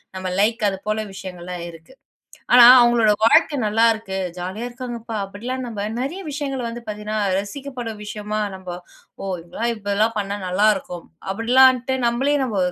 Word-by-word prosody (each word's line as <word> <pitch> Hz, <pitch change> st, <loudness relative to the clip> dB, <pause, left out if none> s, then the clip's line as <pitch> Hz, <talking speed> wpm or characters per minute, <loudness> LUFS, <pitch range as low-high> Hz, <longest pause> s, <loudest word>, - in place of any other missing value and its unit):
நம்ம 185 Hz, 0 st, -4 dB
லைக் 225 Hz, +3 st, +2 dB
அது 195 Hz, -, -4 dB
போல 215 Hz, 0 st, -1 dB
விஷயங்கள்லாம் 180 Hz, -2 st, -7 dB
இருக்கு. 165 Hz, +7 st, -15 dB, 0.6 s
ஆனா 245 Hz, -1 st, +10 dB, 0.2 s
அவங்களோட 235 Hz, -3 st, +4 dB
வாழ்க்கை 305 Hz, +5 st, +5 dB
நல்லா 225 Hz, +2 st, +3 dB
இருக்கு 205 Hz, -3 st, -6 dB, 0.2 s
ஜாலியா 190 Hz, +6 st, -5 dB
இருக்காங்கப்பா 240 Hz, -2 st, -7 dB
அப்படிலாம் 245 Hz, +6 st, -5 dB
நம்ம 210 Hz, -3 st, -4 dB, 0.2 s
நிறைய 290 Hz, +9 st, -4 dB
விஷயங்கள் 275 Hz, -4 st, -3 dB
வந்து 235 Hz, +1 st, -6 dB
பாத்தீங்கன்னா 210 Hz, +1 st, -4 dB, 0.2 s
ரசிக்கப்படும் 240 Hz, +1 st, -6 dB
விஷயமா 210 Hz, 0 st, -4 dB, 0.2 s
நம்ம 190 Hz, -1 st, -10 dB, 0.5 s
ஓ -, -, -6 dB, 0.2 s
இப்படிலாம் 225 Hz, +8 st, -3 dB
இதெல்லாம் 215 Hz, +1 st, 0 dB
பண்ணா 200 Hz, 0 st, -2 dB
நல்லா 200 Hz, +4 st, +2 dB
இருக்கும் 180 Hz, -2 st, -8 dB, 0.3 s
அப்படிலான்ட்டு 255 Hz, +3 st, +4 dB
நம்மளே 270 Hz, +5 st, +1 dB
நம்ம 220 Hz, -6 st, -2 dB
220 Hz, 145 wpm, -21 LUFS, 200-245 Hz, 0.6 s, ஆனா